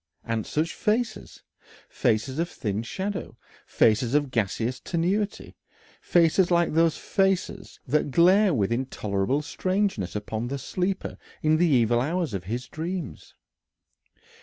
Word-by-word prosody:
And 115 -2 -2
such 160 +3 -1
faces! 220 +1 -2 0.4
Faces 125 +5 0
of 170 +1 0
thin 105 -1 -3
shadow, 190 - -5 0.3
faces 115 +4 +2
of 145 -3 +1
gaseous 115 +2 -1
tenuity. 185 +7 -2 0.5
Faces 175 +1 +3
like 170 -2 +2
those 165 0 +3
faces 195 -2 -1
that 150 +2 +1
glare 185 +7 +5
with 110 - 0
intolerable 115 +1 -1
strangeness 185 - -1
upon 110 +2 -3
the 140 +3 -3
sleeper 185 +7 -3 0.2
in 155 0 +4
the 175 +2 +3
evil 120 -5 +3
hours 165 - -1
of 95 -3 -4
his 120 +5 -4
dreams. 170 +6 -6
150 Hz, 125 wpm, -26 LUFS, 115-180 Hz, 0.5 s, glare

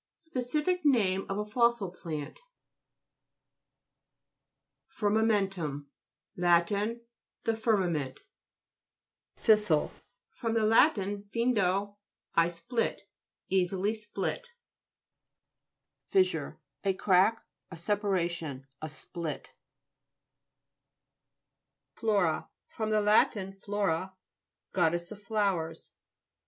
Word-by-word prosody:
Speci 300 -2 -2
fic 360 +2 +1
name 200 -10 +3
of 195 - -2
a 210 - -1
fossil 235 -3 +2
plant 155 - -6 2.6
FIRMAMK'XTUM 195 -9 +1 0.5
Lat. 175 -1 +4 0.8
The 225 - +1
firma 220 -4 +2
ment. 145 -6 -3 1.2
FIS'SILE 210 -9 +3 0.4
fr, 230 - -4
lat 225 +6 +5
flndo, 205 0 0 0.4
I 165 0 +4
split. 175 +8 -2 0.5
Easily 190 +2 +1
split 215 - -4 1.6
FIS'SURE 380 -1 +1 0.3
A 195 -1 +2
crack, 195 +4 +3 0.2
a 165 - -9
separation; 170 -7 -1 0.2
a 155 - -4
split 160 0 -6 2.4
FLO'RA 200 -6 +1 0.2
fr. 220 - -4
lat 215 0 +4 0.3
flora, 190 -3 -1 0.6
goddess 175 -1 +1
of 210 -1 -9
flowers. 195 -6 -1
200 Hz, 75 wpm, -30 LUFS, 175-220 Hz, 2.6 s, lat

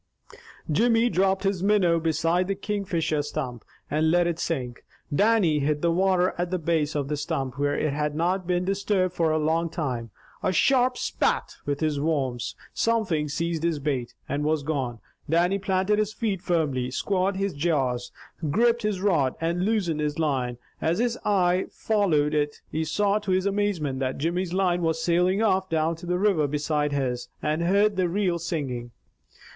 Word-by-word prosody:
Jimmy 230 +7 +3
dropped 190 -1 +1
his 195 -2 0
minnow 190 -4 +3
beside 165 +3 +1
the 195 - -1
Kingfisher 185 -7 -1
stump, 135 -6 -5 0.2
and 155 +2 +1
let 175 +1 +3
it 170 -1 -1
sink. 125 -7 -3 0.3
Dannie 200 -4 +3
hit 150 +2 0
the 170 - +3
water 185 +1 +2
at 175 0 0
the 185 - 0
base 160 -3 0
of 145 -2 -1
the 150 - -1
stump, 145 -3 -3
where 145 0 +1
it 155 -2 0
had 150 0 -1
not 180 +3 0
been 180 0 +1
disturbed 195 -1 0
for 165 -3 +1
a 155 - +2
long 160 +2 +1
time, 125 -8 -3 0.3
a - - +1
sharp 250 +6 +3
"Spat," - - -1
with 145 +1 -1
his 155 -2 0
worms. 140 -6 -1 0.2
Something 190 -10 0
seized 165 +2 -2
his 165 -2 0
bait, 135 -4 -3
and 145 +1 -2
was 155 -1 +1
gone. 135 -6 -2 0.3
Dannie 175 +5 +2
planted 190 +2 +1
his 215 0 0
feet 205 -6 -2
firmly, 145 -9 0
squared 190 +8 0
his 195 0 -1
jaws, 135 -6 0 0.4
gripped 235 +7 +3
his 210 -3 -1
rod, 160 -10 +2
and 170 +2 0
loosened 195 -8 0
his 150 -1 -1
line. 130 -6 -1 0.2
As 165 +2 +1
his 240 +1 0
eye 185 -2 +2
followed 165 -9 +1
it, 150 -1 0
he 160 - -1
saw 200 +6 +1
to 205 -2 -7
his 185 0 +2
amazement 195 -9 0
that 130 -1 -2
Jimmy's 170 +4 -1
line 180 -1 +1
was 165 -1 0
sailing 180 +5 +2
off 190 -3 +2
down 160 0 +1
the 180 0 -1
river 185 -7 +2
beside 150 0 0
his, 125 -3 -2
and 155 +2 -1
heard 200 +3 +3
the 180 -2 +2
reel 180 -2 0
singing. 135 -8 -3
170 Hz, 175 wpm, -26 LUFS, 150-190 Hz, 0.4 s, Jimmy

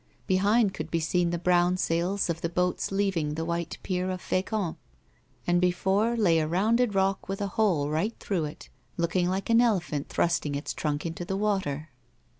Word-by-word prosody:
Behind 200 +2 +3
could 155 +1 -5
be 165 - 0
seen 175 +2 +1
the 175 - -1
brown 175 +1 +3
sails 180 +3 0
of 165 -1 -3
the 170 - -1
boats 180 +2 -1
leaving 190 -7 0
the 160 +1 -3
white 170 0 -3
pier 185 -1 -1
of 185 0 -3
Fecamp, 185 -1 -2 0.7
and 175 0 +2
before 190 +6 +2
lay 175 -7 +4
a 155 - 0
rounded 215 +6 +2
rock 195 0 +1
with 195 - -3
a 200 -1 -2
hole 180 -9 +1
right 160 +10 -1
through 180 -6 -1
it, 150 - -9 0.3
looking 175 +1 +1
like 195 +4 -1
an 230 +1 +6
elephant 180 -11 0
thrusting 170 -4 0
its 145 - -3
trunk 150 0 -2
into 165 +1 -4
the 195 +2 -3
water. 185 -8 -1
180 Hz, 185 wpm, -27 LUFS, 165-195 Hz, 0.7 s, an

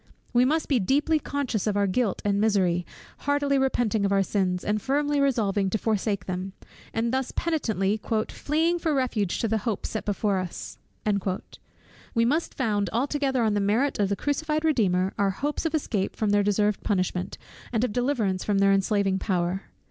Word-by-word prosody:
We 245 +1 +5
must 310 +4 +1
be 270 -4 +2
deeply 290 +10 +2
conscious 260 -9 -2
of 205 -1 +1
our 200 - +3
guilt 200 +1 0
and 200 0 +2
misery, 185 -5 +2 0.3
heartily 285 -1 +1
repenting 240 -5 +1
of 200 - +1
our 195 0 +3
sins, 185 -2 0
and 210 0 0
firmly 290 +3 +1
resolving 210 -8 +1
to 220 - 0
forsake 210 -3 -1
them: 185 +1 -4 0.4
and 230 +2 -1
thus 265 -1 -1
penitently 220 - 0 0.3
"fleeing 325 +4 0
for 320 -3 0
refuge 235 -8 0
to 230 - +1
the 220 0 +1
hope 215 -1 -3
set 220 - -3
before 205 -1 0
us," 185 -2 -6 1.4
we 230 0 +3
must 305 +7 0
found 210 -6 0
altogether 270 0 0
on 215 -2 +2
the 205 - +1
merit 225 +8 +1
of 200 -2 +2
the 200 - +1
crucified 305 +5 -1
Redeemer 195 - +2
our 200 -1 +3
hopes 290 - -2
of 320 - -2
escape 215 -10 -1
from 215 -2 0
their 205 0 +4
deserved 205 0 +1
punishment, 185 -3 -1 0.3
and 230 -1 +1
of 250 - -1
deliverance 235 -7 0
from 205 -2 +1
their 195 0 +4
enslaving 195 -1 +1
power. 185 -1 -1
215 Hz, 180 wpm, -26 LUFS, 195-270 Hz, 1.4 s, We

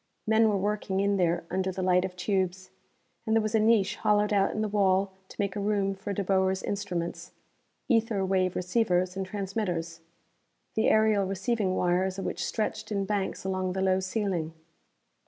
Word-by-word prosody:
Men 220 0 +4
were 205 - +1
working 200 -1 -1
in 200 0 +2
there 170 -2 +1
under 190 +1 0
the 185 0 -4
light 180 0 +3
of 185 -1 -4
tubes. 185 -1 -1 0.6
And 220 - +2
there 225 - +4
was 215 0 -2
a 220 - +4
niche 215 -3 +3
hollowed 210 0 +2
out 195 -1 +3
in 215 - -3
the - - 0
wall 195 -1 +2 0.2
to - - -12
make 200 -2 -1
a - - -2
room 200 -1 0
for 195 +1 -6
De 200 0 -1
Boer's 190 0 +1
instruments 180 -4 -4 0.5
ether 225 -5 +2
wave 185 -1 +1
receivers 180 -1 +1
and 190 -1 -3
transmitters, 185 -4 -3 0.7
the 220 - +2
aerial 215 -2 +3
receiving 195 0 -1
wires 185 +2 +1
of 195 - -4
which - - -3
stretched 215 0 -3
in 200 -1 0
banks 200 -1 -2
along 185 -1 -1
the 190 - -2
low 190 0 +3
ceiling. 185 -4 -2
195 Hz, 180 wpm, -28 LUFS, 185-210 Hz, 0.7 s, Men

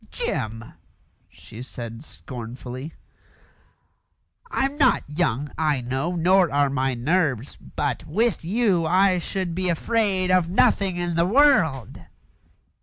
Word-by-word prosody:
"Jim," 115 - -4 0.6
she 115 +1 -12
said 120 -2 -8
scornfully, 125 +1 -8 1.5
"I'm 270 - -1
not 290 - +3
young, 145 -2 -1
I 150 -4 +1
know, 135 +8 -2
nor 180 0 +3
are 140 -1 +2
my 135 -1 0
nerves; 140 -1 0
but - - -4
with 210 +3 0
you 190 -3 +1
I 185 +1 +3
should 185 0 -3
be 185 +1 -1
afraid 190 0 0
of 180 -2 +3
nothing 190 0 +2
in 175 -1 -2
the 170 +1 +2
world!" 195 - +3
165 Hz, 115 wpm, -23 LUFS, 130-185 Hz, 1.5 s, not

